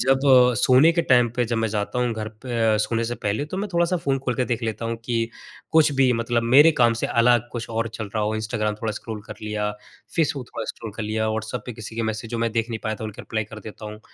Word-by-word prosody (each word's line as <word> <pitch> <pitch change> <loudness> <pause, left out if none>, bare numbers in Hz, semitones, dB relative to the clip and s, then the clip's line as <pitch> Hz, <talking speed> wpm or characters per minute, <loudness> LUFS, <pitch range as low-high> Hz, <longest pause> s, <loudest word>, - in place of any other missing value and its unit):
जब 135 +2 +4 0.4
अ, - - -3
सोने 130 +5 +6
के 170 0 +1
टाइम 125 -4 +4
पे 125 - +2
जब 115 0 -2
मैं 115 0 +1
जाता 105 +3 -2
हूँ 125 -1 +1
घर 110 -1 -4
पे 115 -4 +1
अ, - - +3
सोने 115 +2 0
से 120 +1 -2
पहले 105 +5 -2
तो 155 +5 -6
मैं 205 +2 -2
थोड़ा-सा 170 +1 +2
फ़ोन 140 -5 0
खोल 130 -2 -2
के 125 - 0
देख 120 -1 -2
लेता 110 0 -3
हूँ, 115 0 -2
कि 115 -1 0 0.4
कुछ 160 -2 +5
भी 135 -2 +3
मतलब 115 0 0
मेरे 135 +7 +7
काम 120 -1 +5
से - - +2
अलग 120 0 +3
कुछ 120 -1 -5
और 115 0 -1
चल 110 - -4
रहा 110 - +1
हो, 105 +1 0
इंस्टाग्राम 110 -1 -1
थोड़ा 110 -1 -1
स्क्रॉल 110 +1 -6
कर 110 - -7
लिया, 105 -1 -2 0.5
फेसबुक 145 -6 0
थोड़ा - - -3
स्क्रॉल 110 -2 -6
कर 110 - -3
लिया, 110 +1 -1
व्हाट्सऐप 110 0 -3
पे 125 - -4
किसी 110 0 -9
के 115 - 0
मैसेज 110 0 -3
जो 120 - -2
मैं 115 0 0
देख 115 0 0
नहीं 115 - -3
पाया 110 - -1
था - - -4
उनके 110 -1 -7
रिप्लाई 110 -1 -2
कर 105 +1 -10
देता 110 0 -9
हूँ। 105 0 -10
115 Hz, 270 wpm, -23 LUFS, 110-125 Hz, 0.5 s, मेरे